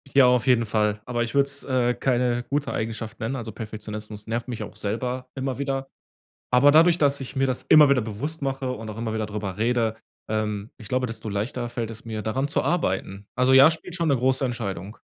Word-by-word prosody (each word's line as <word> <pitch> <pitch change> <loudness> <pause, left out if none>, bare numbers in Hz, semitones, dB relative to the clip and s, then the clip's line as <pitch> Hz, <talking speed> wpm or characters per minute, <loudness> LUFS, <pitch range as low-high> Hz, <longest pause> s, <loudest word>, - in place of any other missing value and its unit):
Ja, 135 -2 +8
auf 125 0 +3
jeden 120 -3 +4
Fall, 105 -1 +1
aber 120 -1 -1
ich 115 - -5
würde 140 0 +5
es, 140 0 -4
äh, 125 -2 +1
keine 120 -1 +1
gute 145 0 -1
Eigenschaft 110 0 -4
nennen, 120 +4 -2
also 115 -3 -6
Perfektionismus 105 -1 -7
nervt 115 +2 -3
mich 120 - -4
auch - - -9
selber 125 +5 -3
immer 130 -1 -3
wieder, 135 -1 -2 0.6
aber 125 +3 +6
dadurch, 165 +3 +6
dass 140 -1 +3
ich 135 +1 -7
mir 135 0 +2
das 130 -1 -2
immer 150 -2 +8
wieder 135 -3 +4
bewusst 140 +9 -5
mache 135 -1 -2
und 115 -3 -6
auch 105 - -7
immer 115 -1 -2
wieder 110 - -1
darüber 105 -2 -5
rede, 115 0 +1 0.3
ähm, 105 0 -2
ich 110 -4 -11
glaube, 130 0 0
desto 110 -1 -5
leichter 120 +4 -3
fällt 120 -2 -3
es 115 0 -9
mir, 110 -2 -4
daran 130 +6 -1
zu 145 - 0
arbeiten. 100 - -1
Also 125 +1 +3
ja, 135 +4 +8
spielt 170 +2 -7
schon 170 -2 0
'ne 140 - +3
große 130 +2 +2
Entscheidung. 105 -4 -4
120 Hz, 220 wpm, -25 LUFS, 110-135 Hz, 0.6 s, Ja